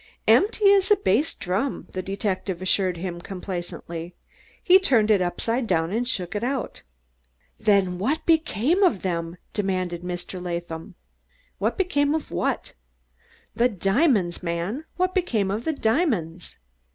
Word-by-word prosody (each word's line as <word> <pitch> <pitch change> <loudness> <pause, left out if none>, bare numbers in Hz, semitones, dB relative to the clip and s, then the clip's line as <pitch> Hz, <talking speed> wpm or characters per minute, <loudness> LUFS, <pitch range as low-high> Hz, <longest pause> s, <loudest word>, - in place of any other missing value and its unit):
"Empty 410 -1 +5
as 385 -1 +3
a 415 - +7
bass 290 - +1
drum," 195 +10 -2
the 185 - -3
detective 190 -1 -3
assured 185 -1 +1
him 175 0 -5
complacently. 175 -2 -6 0.5
"He 375 0 +7
turned 230 - +3
it 200 -3 +4
upside 230 +7 -1
down 165 -2 +1
and 235 +4 -1
shook 185 -7 -2
it." 245 +5 -2 0.8
"Then 195 -4 +2
what 285 - -1
became 320 - +2
of 350 - +3
them?" 170 -2 -2 0.2
demanded 185 -4 -1
Mr. 180 +1 -6
Latham. 170 +1 -5 0.8
"Became 290 -6 +1
of 320 - -4
what?" - - -2 0.8
"The 245 +1 +3
diamonds, 195 - +1
man 180 - -3
what 365 0 0
became 230 - 0
of 215 +4 -3
the 320 - +1
diamonds?" 220 - -1
200 Hz, 130 wpm, -24 LUFS, 180-275 Hz, 0.8 s, a